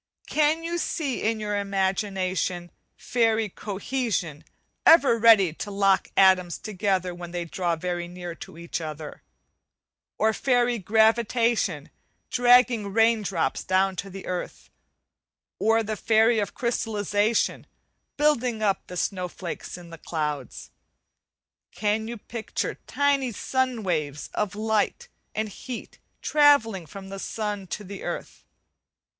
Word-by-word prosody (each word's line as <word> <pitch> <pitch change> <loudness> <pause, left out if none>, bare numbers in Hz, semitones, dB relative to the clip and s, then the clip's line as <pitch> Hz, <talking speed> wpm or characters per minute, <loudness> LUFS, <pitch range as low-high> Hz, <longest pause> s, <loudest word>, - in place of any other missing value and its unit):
Can 310 +2 +2
you 340 +1 -2
see 290 -7 -2
in 220 0 0
your 210 -1 -1
imagination 190 -2 -1 0.3
fairy 225 -3 +1
'Cohesion' 200 - -3 0.4
ever 280 -8 +6
ready 215 -7 +6
to 205 - -6
lock 195 -1 +2
atoms 185 -2 +5
together 190 -3 -1
when 175 0 -8
they 175 0 -4
draw 170 0 -1
very 175 +1 -3
near 175 -1 -7
to 165 - -11
each 170 0 -4
other: 155 -1 -7 1.0
or 220 0 +2
fairy 245 -1 +2
'Gravitation' 220 - +2 0.4
dragging 245 -3 +5
rain 225 +1 +4
drops 190 -5 -1
down 190 0 +2
to 195 - -4
the 195 0 -9
earth: 180 -1 -5 0.9
or 225 +1 +3
the 215 0 -3
fairy 225 +2 +3
of 205 - -3
'Crystallization' 215 -2 0 0.5
building 250 -7 +1
up 200 -2 0
the 180 - -7
snow 185 0 -1
flakes 175 0 -7
in 175 -1 -12
the 165 - -10
clouds? 150 -6 -4 1.0
Can 215 +3 -1
you 235 +1 -5
picture 225 +1 -4
tiny 280 -3 +1
sunbeam 255 -1 -1
waves 150 -5 -2
of 210 -1 -2
light 220 - 0 0.3
and 215 0 -1
heat 235 +4 -8 0.2
travelling 260 - +4
from 195 +1 -10
the 195 0 -6
sun 205 -2 -4
to 210 - -5
the 200 0 -8
earth? - - -6
205 Hz, 125 wpm, -25 LUFS, 180-230 Hz, 1.0 s, ever